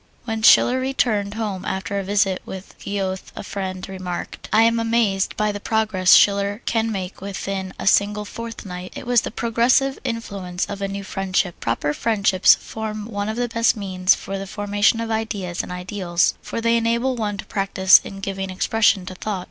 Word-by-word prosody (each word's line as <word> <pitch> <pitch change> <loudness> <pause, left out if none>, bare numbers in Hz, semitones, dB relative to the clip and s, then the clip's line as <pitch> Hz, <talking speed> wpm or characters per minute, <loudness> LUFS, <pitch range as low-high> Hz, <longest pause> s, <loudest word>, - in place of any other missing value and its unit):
When 225 -2 -3
Schiller 250 +3 +6
returned 220 -6 0
home 205 -4 -3
after 190 +1 -3
a - - -3
visit 195 -1 +1
with 190 0 -9
Goethe 190 -2 -3
a - - -6
friend 190 -2 -5
remarked: 185 -2 -6
"I 220 +1 +5
am 230 0 +3
amazed 225 -4 +1
by 210 0 +1
the 205 - -5
progress 210 -4 +2
Schiller 200 +2 +3
can 225 -1 0
make 190 -3 -5
within 195 -1 -4
a - - -6
single 205 +2 +3
fortnight." 200 -5 -7
It - - -7
was 245 -2 +3
the - - -4
progressive 235 +4 +1
influence 200 -7 -3
of 200 -1 -7
a 195 - 0
new 200 0 -5
friendship. 190 -2 -1
Proper 115 +6 -1
friendships 200 -2 +4
form 215 -1 -6
one 205 -2 -3
of 220 - -4
the 245 0 0
best 230 -1 +2
means 185 -2 +2
for 195 0 -6
the 195 - -6
formation 205 +2 +1
of 230 0 -3
ideas 205 -5 -2
and - - -9
ideals, 180 -1 0
for 230 - -5
they 230 0 +3
enable 235 +3 +1
one 210 -3 -2
to - - -7
practise 190 -1 +4
in 195 0 -9
giving 195 0 -4
expression 195 0 +2
to 185 - -7
thought. 195 +1 -4
200 Hz, 185 wpm, -22 LUFS, 190-225 Hz, -, Schiller